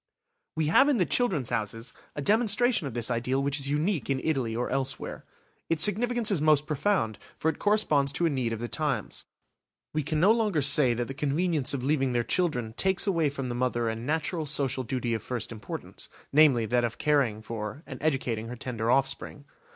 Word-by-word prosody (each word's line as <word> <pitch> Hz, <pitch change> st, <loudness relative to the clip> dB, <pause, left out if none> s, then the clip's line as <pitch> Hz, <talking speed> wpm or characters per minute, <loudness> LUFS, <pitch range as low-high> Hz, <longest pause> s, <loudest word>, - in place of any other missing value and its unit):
We 160 Hz, -, 0 dB
have 265 Hz, -, +5 dB
in 280 Hz, -, +2 dB
the 180 Hz, -, +2 dB
"Children's 175 Hz, -, 0 dB
Houses" 115 Hz, +2 st, -3 dB, 0.2 s
a 145 Hz, -, -4 dB
demonstration 220 Hz, -, +2 dB
of 125 Hz, -, -7 dB
this 120 Hz, 0 st, -1 dB
ideal 125 Hz, +3 st, 0 dB
which 140 Hz, +1 st, -1 dB
is 140 Hz, 0 st, -3 dB
unique 155 Hz, +3 st, -1 dB
in 135 Hz, -1 st, +1 dB
Italy 130 Hz, -8 st, -1 dB
or 120 Hz, +1 st, -1 dB
elsewhere. 135 Hz, 0 st, -2 dB, 0.4 s
Its 165 Hz, -2 st, +3 dB
significance 235 Hz, +2 st, +2 dB
is 180 Hz, -7 st, +1 dB
most 150 Hz, -1 st, +3 dB
profound, 150 Hz, -, 0 dB, 0.2 s
for 160 Hz, -, +1 dB
it 160 Hz, -, -4 dB
corresponds 155 Hz, -10 st, +2 dB
to 175 Hz, -, +1 dB
a -, -, +3 dB
need 130 Hz, -4 st, -1 dB
of 115 Hz, -, -3 dB
the 120 Hz, -, -3 dB
times. -, -, -2 dB, 0.7 s
We 155 Hz, -, 0 dB
can 155 Hz, +2 st, -2 dB
no 190 Hz, +6 st, +5 dB
longer 210 Hz, -10 st, +1 dB
say 140 Hz, -3 st, +5 dB
that 120 Hz, +1 st, -2 dB
the 135 Hz, -, -5 dB
convenience 145 Hz, 0 st, 0 dB
of 125 Hz, -, -4 dB
leaving 135 Hz, -2 st, +1 dB
their 120 Hz, -1 st, +1 dB
children 125 Hz, -4 st, -1 dB
takes 190 Hz, +8 st, +2 dB
away 165 Hz, -7 st, +1 dB
from 135 Hz, -2 st, -5 dB
the -, -, -2 dB
mother 120 Hz, -2 st, 0 dB
a 110 Hz, -, -2 dB
natural 155 Hz, +6 st, -2 dB
social 135 Hz, -3 st, +1 dB
duty 125 Hz, -1 st, -2 dB
of 110 Hz, -, -2 dB
first 120 Hz, 0 st, -4 dB
importance; 110 Hz, -2 st, -8 dB, 0.2 s
namely, 140 Hz, -6 st, +5 dB
that 120 Hz, +2 st, +1 dB
of 120 Hz, -1 st, -2 dB
caring 135 Hz, -8 st, +1 dB
for 115 Hz, +5 st, -6 dB
and -, -, -9 dB
educating 125 Hz, -7 st, -1 dB
her 120 Hz, -, -6 dB
tender 115 Hz, -2 st, -3 dB
offspring. 135 Hz, +2 st, 0 dB
140 Hz, 200 wpm, -27 LUFS, 120-160 Hz, 0.7 s, have